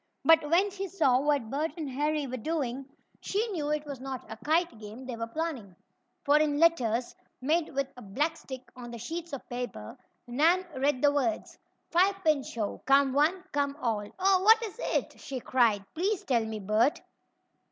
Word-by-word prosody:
But 320 Hz, -2 st, +5 dB
when 375 Hz, +5 st, +3 dB
she 390 Hz, 0 st, -4 dB
saw 310 Hz, -10 st, +3 dB
what 285 Hz, -5 st, 0 dB
Bert 300 Hz, +4 st, -1 dB
and 310 Hz, -3 st, -4 dB
Harry 295 Hz, +2 st, -1 dB
were 255 Hz, -1 st, -4 dB
doing, 265 Hz, -1 st, -3 dB, 0.3 s
she 425 Hz, +4 st, -1 dB
knew 310 Hz, -7 st, -2 dB
it 300 Hz, 0 st, -1 dB
was 280 Hz, -3 st, -6 dB
not 260 Hz, -1 st, -6 dB
a 220 Hz, -, -6 dB
kite 325 Hz, 0 st, 0 dB
game 220 Hz, +4 st, -9 dB
they 250 Hz, -2 st, -5 dB
were 230 Hz, 0 st, -4 dB
planning. 245 Hz, -, -4 dB, 0.5 s
For 295 Hz, +1 st, +5 dB
in 300 Hz, -1 st, +1 dB
letters, 255 Hz, -8 st, +2 dB, 0.2 s
made 310 Hz, +5 st, +1 dB
with 275 Hz, 0 st, +1 dB
a 250 Hz, -, -11 dB
black 290 Hz, +11 st, -1 dB
stick 260 Hz, -5 st, -9 dB
on 245 Hz, -1 st, -9 dB
the 235 Hz, -, -7 dB
sheets 335 Hz, +8 st, -6 dB
of 275 Hz, -, -7 dB
paper, 245 Hz, -, -6 dB, 0.3 s
Nan 320 Hz, +9 st, +3 dB
read 265 Hz, 0 st, 0 dB
the 290 Hz, 0 st, +5 dB
words: 250 Hz, -7 st, -1 dB, 0.4 s
FIVE 375 Hz, +3 st, +4 dB
PIN 305 Hz, -3 st, +4 dB
SHOW 225 Hz, -5 st, -4 dB
COME 275 Hz, -1 st, +5 dB
ONE 315 Hz, +7 st, +2 dB
COME 285 Hz, -1 st, -1 dB
ALL 215 Hz, -6 st, -1 dB
"Oh, 380 Hz, 0 st, +3 dB
what 445 Hz, +3 st, +6 dB
is 445 Hz, +1 st, -6 dB
it?" -, -, -2 dB
she 270 Hz, -2 st, -5 dB
cried. 230 Hz, -6 st, +2 dB
"Please 390 Hz, +4 st, -1 dB
tell 245 Hz, -, +1 dB
me, 220 Hz, 0 st, -4 dB
Bert!" 215 Hz, +7 st, +2 dB
285 Hz, 185 wpm, -29 LUFS, 245-325 Hz, 0.5 s, what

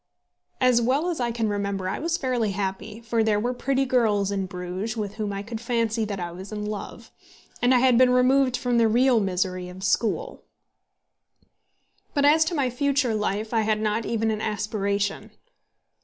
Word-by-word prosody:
As 250 Hz, -2 st, +4 dB
well 280 Hz, +9 st, +1 dB
as 330 Hz, -, -4 dB
I 240 Hz, -1 st, 0 dB
can 230 Hz, -1 st, -1 dB
remember 200 Hz, -2 st, -2 dB
I -, -, -2 dB
was 335 Hz, +3 st, -1 dB
fairly 245 Hz, -, -1 dB
happy, 200 Hz, +3 st, -4 dB
for 230 Hz, -1 st, 0 dB
there 215 Hz, -1 st, +2 dB
were 245 Hz, +4 st, -1 dB
pretty 270 Hz, +2 st, 0 dB
girls 215 Hz, -6 st, +1 dB
at 195 Hz, -2 st, -2 dB
Bruges 185 Hz, +5 st, -5 dB
with 205 Hz, -2 st, -3 dB
whom 210 Hz, -2 st, -2 dB
I 200 Hz, 0 st, -4 dB
could 225 Hz, +1 st, -6 dB
fancy 230 Hz, -2 st, 0 dB
that 200 Hz, -2 st, -4 dB
I 175 Hz, -1 st, -4 dB
was 190 Hz, +4 st, -9 dB
in 210 Hz, -1 st, -4 dB
love; 210 Hz, -1 st, -7 dB, 0.5 s
and 245 Hz, -, +3 dB
I 255 Hz, -, +6 dB
had 250 Hz, -1 st, +4 dB
been 255 Hz, -1 st, +6 dB
removed 255 Hz, 0 st, +3 dB
from 245 Hz, -1 st, +1 dB
the 230 Hz, -, +4 dB
real 245 Hz, +2 st, +4 dB
misery 185 Hz, -2 st, -2 dB
of 185 Hz, +1 st, -10 dB
school. 200 Hz, +3 st, 0 dB, 1.7 s
But 285 Hz, -1 st, +3 dB
as 310 Hz, +2 st, +6 dB
to 340 Hz, -, -2 dB
my 280 Hz, -4 st, +1 dB
future 275 Hz, -1 st, +1 dB
life 215 Hz, +1 st, -2 dB
I 225 Hz, -, +3 dB
had 215 Hz, 0 st, +1 dB
not 215 Hz, +1 st, -1 dB
even 225 Hz, -1 st, 0 dB
an 215 Hz, -1 st, -3 dB
aspiration. 205 Hz, 0 st, -2 dB
220 Hz, 185 wpm, -25 LUFS, 200-250 Hz, 1.7 s, I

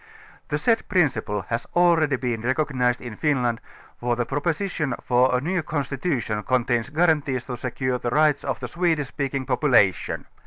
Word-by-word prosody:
The -, -, -1 dB
said 230 Hz, -2 st, +1 dB
principle 120 Hz, -, +1 dB
has 115 Hz, 0 st, -2 dB
already 170 Hz, -5 st, +4 dB
been 125 Hz, -3 st, -2 dB
recognized 130 Hz, -1 st, 0 dB
in 120 Hz, -3 st, -7 dB
Finland, 125 Hz, -4 st, 0 dB, 0.4 s
for 120 Hz, 0 st, 0 dB
the 120 Hz, 0 st, -1 dB
projwsition 150 Hz, -, -1 dB
for 125 Hz, +1 st, +3 dB
a -, -, 0 dB
new 175 Hz, +6 st, -1 dB
constitution 135 Hz, -7 st, -2 dB
contains 120 Hz, +1 st, 0 dB
guarantees 150 Hz, -5 st, +1 dB
to 125 Hz, -, -4 dB
secure 125 Hz, +1 st, -2 dB
the 120 Hz, -, -2 dB
rights 150 Hz, +2 st, +3 dB
of -, -, -2 dB
the -, -, -5 dB
Swedish 165 Hz, -6 st, 0 dB
speaking 140 Hz, -2 st, -3 dB
po 125 Hz, -1 st, 0 dB
pulation. 120 Hz, -10 st, +2 dB
130 Hz, 160 wpm, -24 LUFS, 120-155 Hz, 0.4 s, already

